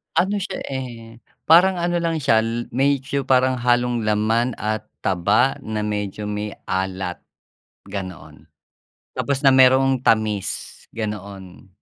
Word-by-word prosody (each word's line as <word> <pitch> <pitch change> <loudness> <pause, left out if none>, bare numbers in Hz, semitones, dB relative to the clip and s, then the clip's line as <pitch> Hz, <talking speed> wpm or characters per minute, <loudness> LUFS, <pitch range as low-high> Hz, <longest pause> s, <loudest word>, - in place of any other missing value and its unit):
Ano 200 +4 +2
siya, 200 - -4
eh, 120 -4 -7 0.3
parang 180 +4 +7
ano 175 0 0
lang 165 -2 -1
siya 115 -4 +3 0.3
medyo 135 +1 0
parang 130 0 +3
halong 120 -1 +1
laman 110 +3 +1
at 110 0 -2 0.2
taba 95 +8 +2
na 110 -1 -3
medyo 105 0 -3
may 105 0 -4 0.2
alat 95 -1 -2 0.7
ganoon. 90 -6 -8 0.7
Tapos 140 0 -2
na 135 - +7
mayroong 130 0 +5
tamis 110 -4 0
ganoon. 100 -4 -7
115 Hz, 115 wpm, -21 LUFS, 105-135 Hz, 0.7 s, parang